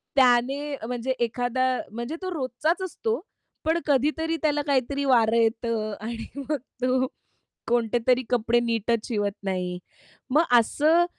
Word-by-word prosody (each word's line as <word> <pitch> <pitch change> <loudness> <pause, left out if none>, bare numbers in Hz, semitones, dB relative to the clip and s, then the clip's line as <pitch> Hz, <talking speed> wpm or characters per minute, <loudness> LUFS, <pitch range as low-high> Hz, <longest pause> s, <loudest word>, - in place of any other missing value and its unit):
त्याने 270 +3 +3
म्हणजे 250 +1 -2
एखादा 245 +2 0 0.3
म्हणजे 235 +7 -4
तो 370 - -3
रोजचाच 305 - -1
असतो. 440 +5 -2 0.5
पण 325 +2 +2
कधीतरी 305 +4 +1
त्याला 295 -1 +2
काहीतरी 280 +1 +1
वारं 230 -4 +4
येतं 225 -1 +1
आणि 225 +1 -5
मग 280 +2 -2 0.3
तो 255 +1 +2 0.6
कोणते 235 0 +2
तरी 255 0 +4
कपडे 240 0 +2
नीटच 230 -1 0
शिवत 205 -3 0
नाही. 180 -2 -2 0.5
मग 300 +5 +4 0.2
असं 310 +9 +3
250 Hz, 130 wpm, -25 LUFS, 230-290 Hz, 0.6 s, वारं